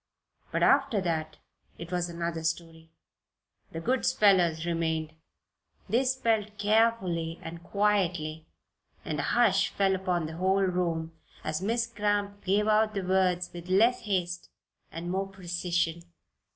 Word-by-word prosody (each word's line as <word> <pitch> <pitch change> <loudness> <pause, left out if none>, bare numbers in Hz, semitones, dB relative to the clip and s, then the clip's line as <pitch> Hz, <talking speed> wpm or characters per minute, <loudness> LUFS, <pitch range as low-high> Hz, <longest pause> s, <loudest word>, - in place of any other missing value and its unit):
But - - 0
after 275 -6 +4
that 160 -3 -2 0.4
it 170 +1 -8
was 175 -1 -1
another 170 -1 -3
story. 165 0 -4 0.8
The 165 - -5
good 255 +9 0
spellers 175 -6 +3
remained. 160 -2 -1 0.7
They 250 +4 +2
spelled 225 -5 0
carefully 205 -6 +1
and 165 +1 -7
quietly 175 -6 0 0.6
and - - -3
a - - -1
hush 210 -5 +4
fell 195 -1 +1
upon 180 -3 -1
the 160 +1 -6
whole 190 +2 +2
room 170 -3 -1 0.3
as 155 +2 -2
Miss 230 +4 0
Cramp 205 -3 -2
gave 205 +3 +2
out 215 0 +3
the 195 - -1
words 180 -1 +1
with 175 +1 -9
less 230 +7 +4
haste 175 -4 -2 0.4
and 170 +2 -5
more 195 +1 -1
precision. 175 -3 -2
180 Hz, 135 wpm, -28 LUFS, 170-205 Hz, 0.8 s, after